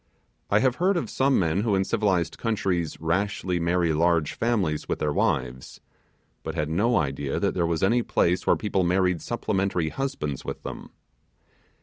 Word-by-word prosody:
I 100 - +4
have 130 -1 +2
heard 185 +2 +2
of - - -3
some 135 0 +2
men 90 +1 +1
who 105 -2 +1
in 95 - +2
civilized 95 -5 0
countries 95 -8 -1
rashly 90 +2 -1
marry 85 -1 +1
large 85 -1 +2
families 100 -10 -1
with - - 0
their 75 -1 -1
wives, 65 -2 -1 0.6
but 80 - -5
had 75 -2 -1
no 115 +8 +2
idea 70 -1 -1
that - - 0
there 85 -2 0
was 85 0 -1
any 115 +5 +3
place 90 -5 0
where - - +5
people 100 -3 -1
married 90 -1 +1
supplementary 95 -6 -1
husbands 80 - -3
with - - -6
them. - - -7
90 Hz, 165 wpm, -25 LUFS, 80-105 Hz, 0.6 s, where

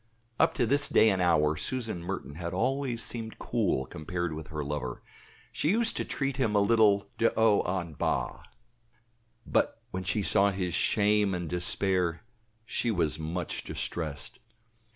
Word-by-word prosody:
Up - - +3
to - - +2
this 140 +5 +3
day 110 - +5
and 95 -1 0
hour, 75 -3 +3
Susan 110 +2 -3
Merton 90 -4 -5
had 85 +3 -5
always 130 +1 0
seemed 115 -2 -3
cool, 100 - 0
compared 85 +4 -4
with 80 0 -7
her 75 -1 -4
lover; 70 -4 -4 0.5
she 150 - 0
used 230 +4 +3
to - - 0
treat 135 -1 -2
him 115 -6 +1
a - - +5
little 100 -1 +4
de 115 - +4
haut 110 -4 +3
en 85 -2 -11
bas. - - -1 1.1
But - - +1
when 95 - -3
she 100 +3 0
saw 100 +1 +4
his 95 -3 -2
shame 105 0 +2
and 90 -1 -4
despair, 90 -1 0 0.4
she 120 - -1
was 80 -7 0
much 80 +2 -3
distressed. 75 -4 -5
95 Hz, 155 wpm, -29 LUFS, 85-110 Hz, 1.1 s, day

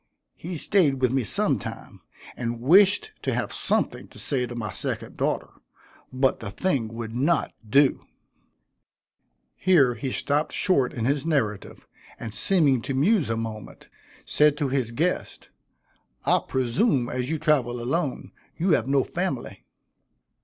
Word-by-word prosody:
He 175 0 -6
staid 150 -6 +2
with 125 -2 +2
me 135 -2 +1
sometime, 105 - -3 0.3
and 120 -1 -3
wished 200 - +4
to - - -1
have - - -2
something - - -1
to - - -17
say 125 -4 -1
to 120 - -8
my 110 -4 -4
second - - -4
daughter, - - -1 0.6
but 130 +1 +1
the 110 - -6
thing 125 - -1
would 115 0 -7
not 150 +6 +1 0.2
do." 140 +4 +3 1.5
Here 155 -10 +4
he 125 +3 -4
stopped 145 +4 -1
short 140 -10 +2
in 115 -2 -3
his 140 +1 +1
narrative, 125 -11 -2 0.3
and 110 - -6
seeming 140 - +3
to 135 +2 -3
muse 165 - +2
a 115 - 0
moment, 110 -2 -7 0.4
said 150 -1 +3
to 145 -3 -1
his 130 -3 0
guest, 160 +10 -2 0.8
"I - - +4
presume, 130 - +1
as 125 +1 -3
you 160 - 0
travel 145 -6 +1
alone, 135 +3 -2 0.3
you 180 +3 +1
have 155 - +2
no 135 -1 +3
family." 175 -8 -4
135 Hz, 145 wpm, -25 LUFS, 120-160 Hz, 1.5 s, wished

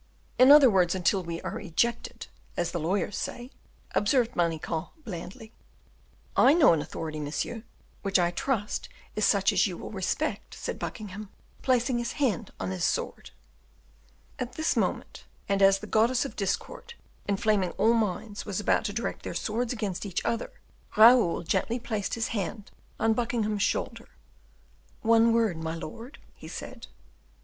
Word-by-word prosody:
"In 255 +1 +8
other 290 -2 +9
words, 185 -5 +3
until 190 +1 +2
we 170 -1 -5
are - - -4
ejected, 235 +6 -1 0.3
as 175 -1 0
the 175 - -2
lawyers 185 +4 -1
say," 245 +2 -5 0.4
observed 240 +3 +2
Manicamp, 165 -1 -1
blandly. 220 - -8 0.8
"I 270 +5 +6
know 300 - +6
an 160 - +1
authority, 155 0 -5
monsieur, 150 +10 -3 0.4
which 195 -1 +2
I 175 -1 +2
trust 210 +2 -2 0.3
is 215 - +2
such 200 0 +3
as 185 0 +3
you 180 -3 -5
will - - -8
respect," 190 -3 -2
said - - -5
Buckingham, 210 -1 -6 0.3
placing 250 -1 +2
his 240 - -3
hand 240 -6 0
on - - -3
his 185 -2 -3
sword. 485 - -2 1.1
At 250 -1 -4
this 315 - 0
moment, - - -2 0.2
and 200 0 +1
as 195 0 +6
the 210 - -9
goddess 230 +5 +2
of 275 - -7
Discord, 470 - -3 0.3
inflaming 200 -2 +1
all 230 - +3
minds, 210 -1 -1
was 205 -2 -3
about 210 - +2
to 205 - -2
direct 230 +2 -3
their - - -6
swords 230 +2 -1
against 210 -7 -3
each 195 -4 -3
other, 230 0 -1 0.5
Raoul 225 -6 +6
gently 230 +7 0
placed 220 -4 -3
his 225 -1 -2
hand 205 0 -4 0.3
on 225 0 +3
Buckingham's 220 -3 -1
shoulder. - - -1 0.9
"One 230 +1 +5
word, 225 -7 +2
my 160 0 -4
lord," 230 - -8 0.2
he - - -12
said. - - -8
210 Hz, 155 wpm, -28 LUFS, 185-235 Hz, 1.1 s, other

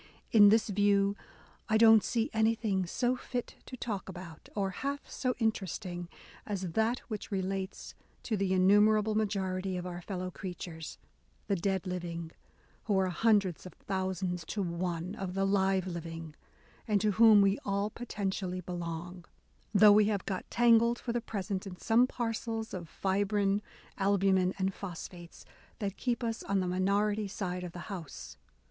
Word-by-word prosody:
In 205 -2 +8
this 220 +1 +3
view, 200 0 +3 0.5
I 220 - +4
don't 220 -1 +7
see 230 -2 -1
anything 220 -4 +1
so 245 +7 0
fit 250 -1 -5
to 255 - -8
talk 205 -5 -4
about, 175 -3 -10
or 195 -2 0
half 280 +8 -4
so 255 -1 -2
interest 220 -6 -1
ing, 175 -1 -5 0.3
as 190 -4 -3
that 220 +6 +1
which 215 -3 -5
relates 190 -1 -3 0.3
to 225 - -1
the 195 -2 0
innumerable 210 +3 +4
majority 190 -3 -1
of 180 - -5
our 175 -1 -5
fellow 185 0 -4
creatures, 175 -4 -7 0.5
the 200 - +1
dead 190 +1 -1
living, 170 -2 -4 0.5
who 205 -3 +2
are 190 -1 +2
hundreds 200 -3 +2
of - - -12
thousands 185 -2 -3
to 205 +3 -2
one 175 0 -3
of 190 -3 -5
the 195 0 +1
live 195 -1 +2
living 165 -3 -6 0.5
and 210 -2 +3
to 215 - +2
whom 220 +1 +7
we 200 0 +3
all 200 +1 -1
potentially 195 -5 -3
belong, 175 0 -6 0.5
though 210 0 +7
we 210 0 +6
have 205 -2 -1
got 190 -2 -4
tangled 235 0 +4
for 235 - -4
the 240 - 0
present 200 -3 -4
in 180 -2 -8
some 235 +5 +3
parcels 225 -2 -3
of 175 -4 -6
fibrine, 200 +1 +1 0.4
albumen, 195 -2 +3
and 190 0 0
phosphates, 175 -2 -9 0.3
that 200 -2 -3
keep 245 -1 -2
us 225 -1 -2
on 200 -1 0
the 185 - -1
minority 200 +3 +1
side 180 -2 -4
of 175 -1 -6
the 175 - -7
house." 145 - -8
195 Hz, 160 wpm, -31 LUFS, 180-215 Hz, 0.5 s, In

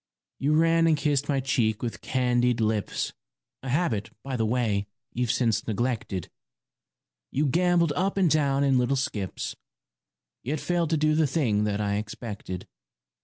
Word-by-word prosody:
You 145 +3 +2
ran 165 +1 +4
and 160 -2 +4
kissed 145 -1 0
my 140 -2 +2
cheek 115 -4 0
with 120 - -4
candied 125 -2 +1
lips, 110 -2 -1 0.5
A 135 - -6
habit, 125 - 0
by 135 -1 -3
the 110 -2 0
way, 110 -4 0 0.3
you've 125 0 -1
since 115 -2 +1
neglected; 110 -5 -2 1.0
You 145 +3 0
gambolled 170 +2 +3
up 190 +5 0
and 190 -2 +4
down 140 -3 +2
in 135 -2 +3
little 125 +2 +2
skips, 105 -8 -3 0.9
Yet 145 +5 -2
failed 170 -1 0
to 160 - +2
do 155 0 +3
the 155 -1 +3
thing 115 -8 +1
that 105 -1 -1
I 100 -1 0
expected. 105 -3 -6
130 Hz, 155 wpm, -27 LUFS, 110-155 Hz, 1.0 s, ran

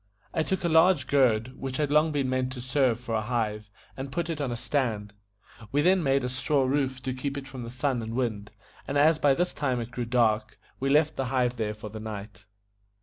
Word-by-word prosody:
I 160 - +1
took 190 +4 -1
a - - +2
large 160 -2 +5
gourd, 130 -4 +2
which 130 -1 -4
had 150 -2 0
long 150 +2 +4
been 140 -3 0
meant 130 0 0
to 125 - -7
serve 130 -2 +1
for 120 -2 -5
a 110 - +1
hive, 105 -2 -2 0.3
and 135 0 -6
put 170 +3 -2
it 155 -2 -4
on 135 -3 -1
a 120 - -3
stand, 115 -5 -1 0.6
We 145 +1 +2
then 185 +2 +4
made 135 -3 +2
a - - 0
straw 135 +2 +1
roof 130 -1 0
to 130 0 -2
keep 140 +2 -4
it 135 -1 -6
from 130 -2 -8
the 115 - -6
sun 130 0 -1
and 115 +1 -5
wind, 110 -5 -2 0.4
and 140 - -1
as 155 +2 +5
by 140 -3 +4
this 175 +3 0
time 130 -4 -1
it 120 0 -5
grew 120 0 -3
dark, 110 -3 +1 0.2
we 135 - 0
left 150 +2 +3
the 135 - 0
hive 125 -1 0
there 105 -2 -2
for 105 0 -8
the 110 +1 -8
night. 105 -1 -8
130 Hz, 235 wpm, -27 LUFS, 115-145 Hz, 0.6 s, large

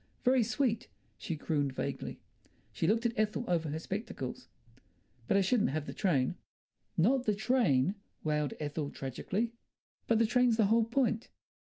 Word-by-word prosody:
"Very 255 0 +5
sweet!" 230 0 0 0.3
she 165 - -4
crooned 145 -2 0
vaguely; - - -4 0.5
she 135 +10 -1
looked 225 +4 +2
at 235 - +2
Ethel 215 +2 0
over 165 -3 +1
her 150 - -2
spectacles. 165 - -5 0.8
"But 195 - +3
I - - +5
shouldn't 205 +4 +2
have 150 +1 -2
the - - -6
train." 145 -11 +1 0.6
"Not 250 +9 +3
the 210 - +3
train!" 200 - +2 0.3
wailed 150 -2 0
Ethel 150 -1 -3
tragically. 185 - -3 0.6
"But 230 - +4
the 230 - +4
train's 245 0 +3
the 220 - +5
whole 225 +2 +4
point." 235 -1 0
205 Hz, 155 wpm, -32 LUFS, 150-230 Hz, 0.8 s, Very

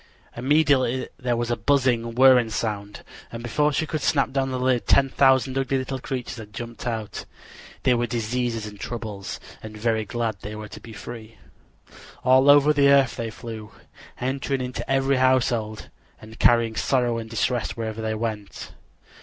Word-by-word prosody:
Immediately 130 -1 +2
there 125 -2 0
was 120 0 -2
a - - +2
buzzing, 120 -5 +1
whirring 130 -2 +6
sound, 105 -2 -4 0.3
and 115 0 -7
before 150 +6 +1
she 160 - 0
could 155 0 -3
snap 140 0 +1
down 135 0 0
the 130 - -2
lid 125 -1 0
ten 135 -1 +4
thousand 130 0 +3
ugly 135 0 0
little 130 0 -3
creatures 125 -2 -5
had 105 -2 -11
jumped 120 +1 -7
out. 110 -3 -4 0.6
They 125 - +4
were 120 0 0
diseases 115 -1 -2
and 105 -1 -10
troubles, 105 -5 -6 0.2
and 110 -1 -9
very 110 0 0
glad 115 0 -2
they 105 +1 -7
were 105 0 -8
to - - -10
be 115 - -12
free. 110 0 -9 0.9
All 130 +2 +5
over 145 +1 +7
the 140 -1 +4
earth 140 -3 +4
they 115 -1 -4
flew, 110 -1 -9 0.5
entering 135 +1 -2
into 125 +1 -5
every 135 0 +2
household, 120 -4 +1 0.3
and 110 +1 -13
carrying 115 -2 +4
sorrow 120 -1 +1
and 110 0 -7
distress 120 +1 -1
wherever 110 -1 -4
they 110 0 -2
went. 110 -2 -5
120 Hz, 170 wpm, -24 LUFS, 110-130 Hz, 0.9 s, over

